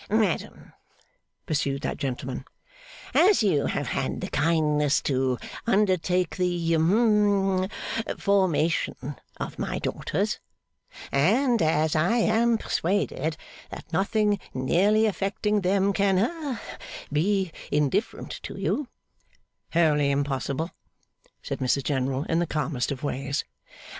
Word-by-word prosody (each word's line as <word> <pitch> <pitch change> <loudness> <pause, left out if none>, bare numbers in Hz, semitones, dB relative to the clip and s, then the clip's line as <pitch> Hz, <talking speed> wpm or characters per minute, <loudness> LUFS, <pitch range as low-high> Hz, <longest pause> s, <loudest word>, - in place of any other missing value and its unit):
'Madam,' 215 -5 -1 0.7
pursued 140 -2 -1
that - - -2
gentleman, 130 -2 -4 0.7
'as 380 - +5
you 150 -9 +2
have - - -2
had - - -2
the - - -5
kindness 150 -2 +2
to 130 -2 +1 0.3
undertake 185 -4 +2
the 175 -2 0
hum 195 +1 +3 0.5
formation 180 -6 +1 0.4
of - - -6
my - - -2
daughters, - - -2 0.7
and 230 - +3
as 155 -1 +2
I 175 +10 +3
am 230 +1 +3
persuaded 165 -6 -1 0.3
that 165 - -10
nothing 205 +3 +2 0.2
nearly 195 +12 +3
affecting 205 0 0
them 195 +2 +2
can 195 -1 +2
ha 275 - -1 0.5
be 190 +3 +1 0.2
indifferent 150 - 0
to - - -7
you 290 -2 -1 0.4
' - - -41
'Wholly 150 -4 +3
impossible,' 140 +3 -1 0.7
said - - -4
Mrs 130 +1 +1
General 135 0 0
in 165 +1 0
the 175 - 0
calmest 150 -4 -1
of 140 0 -5
ways. 140 -1 -2
170 Hz, 115 wpm, -26 LUFS, 145-205 Hz, 0.7 s, as